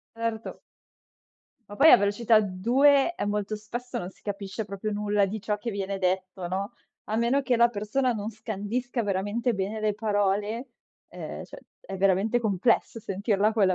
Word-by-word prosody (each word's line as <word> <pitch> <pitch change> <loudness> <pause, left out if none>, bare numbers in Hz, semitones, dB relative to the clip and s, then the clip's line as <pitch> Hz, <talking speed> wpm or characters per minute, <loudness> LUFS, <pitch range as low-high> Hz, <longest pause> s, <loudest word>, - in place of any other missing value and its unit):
Certo. 230 -1 -4 1.1
Ma 205 - -9
poi 315 +3 +8
a - - +11
velocità 215 +2 +3
2 265 - +3
e - - -3
molto 210 +1 -1
spesso 240 +4 -5
non 180 +1 -5
si - - -26
capisce 205 +1 -4
proprio 200 +1 -4
nulla 205 0 +1
di 215 +2 -5
ciò 210 +1 -1
che 230 +3 -4
viene 195 -1 -3
detto, 185 -1 -1
no, 195 +4 -3 0.3
a 215 - -2
meno 240 +5 +2
che 250 -2 +1
la 235 0 +5
persona 240 +4 0
non 215 0 -4
scandisca 225 +3 -3
veramente 205 +5 0
bene 200 +3 -2
le 215 -1 +1
parole, 205 +2 0 0.4
ehm, - - -7
cioè - - -12 0.2
è 195 - -7
veramente 195 +5 +2
complesso 220 +2 +1
sentirla 205 +1 0
a - - -1
quella 195 -4 +3
210 Hz, 170 wpm, -27 LUFS, 200-230 Hz, 1.1 s, a